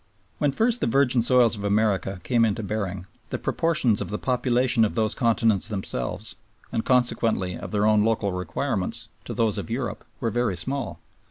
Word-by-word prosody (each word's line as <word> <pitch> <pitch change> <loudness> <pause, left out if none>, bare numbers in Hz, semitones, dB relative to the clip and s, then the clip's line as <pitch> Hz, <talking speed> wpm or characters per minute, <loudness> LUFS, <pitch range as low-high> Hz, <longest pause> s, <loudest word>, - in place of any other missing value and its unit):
When 145 - +2
first 230 - +1
the - - +1
virgin 130 0 +3
soils 120 -1 +4
of 100 - -7
America 100 -2 +1
came 120 -2 +2
into 110 0 0
bearing, 100 -3 -3 0.2
the - - -2
proportions 155 -10 +1
of - - -4
the 105 - -2
population 125 -1 +2
of 110 - 0
those 110 -1 +1
continents 115 -4 +2
themselves, 95 - -4 0.4
and 110 - -1
consequently 115 -7 +1
of - - -7
their 105 -1 +1
own 105 -1 +4
local 110 -3 +1
requirements, 90 -2 -2 0.2
to - - -5
those 110 -3 +1
of - - -6
Europe 115 -2 -3 0.2
were 115 - -1
very 120 -6 0
small. 130 - -3
115 Hz, 175 wpm, -25 LUFS, 100-125 Hz, 0.4 s, soils